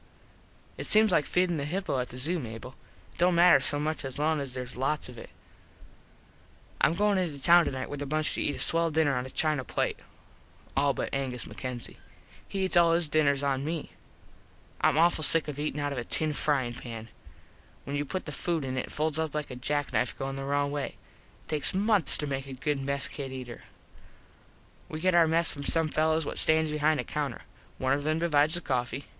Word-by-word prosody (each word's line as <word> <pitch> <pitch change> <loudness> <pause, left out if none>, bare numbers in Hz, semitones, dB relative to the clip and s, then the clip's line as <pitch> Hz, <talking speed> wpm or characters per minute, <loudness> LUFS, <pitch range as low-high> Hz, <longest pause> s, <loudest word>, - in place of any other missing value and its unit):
It - - -3
seems 215 -1 +5
like 150 -4 +2
feedin 180 -2 +1
the 140 - -3
hippo 175 -3 -2
at 125 - -3
the 125 - -10
zoo, 165 +7 -1
Mable. 115 0 -8 0.4
It - - -20
dont 175 0 +3
matter 175 +1 +6
so 145 -1 +1
much 155 +1 -2
as 135 -1 -4
long 155 +1 +1
as 135 -3 -2
theres 125 -1 -6
lots 135 +3 -2
of 125 - -12
it. - - -11 1.5
Im 165 - +4
goin 205 +1 +2
into 160 -6 -3
town 170 +4 +5
tonite 130 -1 -4
with 145 0 -7
a 145 - -4
bunch 155 +2 -1
to - - -3
eat 145 - -1
a - - -8
swell 165 0 +2
dinner 155 -3 +1
on 125 +1 -3
a - - -10
china 150 -1 0
plate. - - -2 0.8
All 140 0 +2
but - - -4
Angus 130 -3 -3
MacKenzie. 125 -3 -7 0.5
He 195 -1 -2
eats 185 - 0
all 170 -1 +5
his 165 -2 +1
dinners 140 -2 +2
on 135 -1 0
me. 160 +1 -4 0.9
Im - - +3
awful 165 -1 +3
sick 160 +1 +4
of 145 -1 -6
eatin 150 -1 -3
out 145 0 -2
of 130 - -4
a - - -4
tin 155 +5 0
fryin 135 -5 -1
pan. 115 -2 -9 0.7
When 140 - -5
you 145 - -1
put 185 +6 -5
food 160 +1 -2
in 130 0 -4
it - - -4
it - - -13
folds 155 0 -1
up 160 -2 -3
like 150 -3 -4
a - - -6
jacknife 140 -1 -2
goin 135 0 -4
the 135 0 -5
wrong 140 0 0
way. 145 -1 -4 0.5
It - - -28
takes 155 +3 0
months 205 -2 +8
to 150 - -3
make 135 -1 -4
a 135 - -7
good 140 +2 -2
mess 140 0 -1
kit 135 -2 -7
eater. 125 -2 -8 1.2
We 155 - -6
get 185 +2 +1
our 170 -1 +5
mess 165 +1 +2
from 140 - -7
some 160 +2 +4
fellos 160 +1 +1
what - - -2
stands 160 -1 +3
behind 150 0 +1
a - - -1
counter. 150 -2 -4 0.4
One 130 +1 0
of 145 - -1
them 155 +1 0
divides 160 -1 +2
the 175 - -1
coffee. 130 0 -3
150 Hz, 215 wpm, -28 LUFS, 135-160 Hz, 1.5 s, months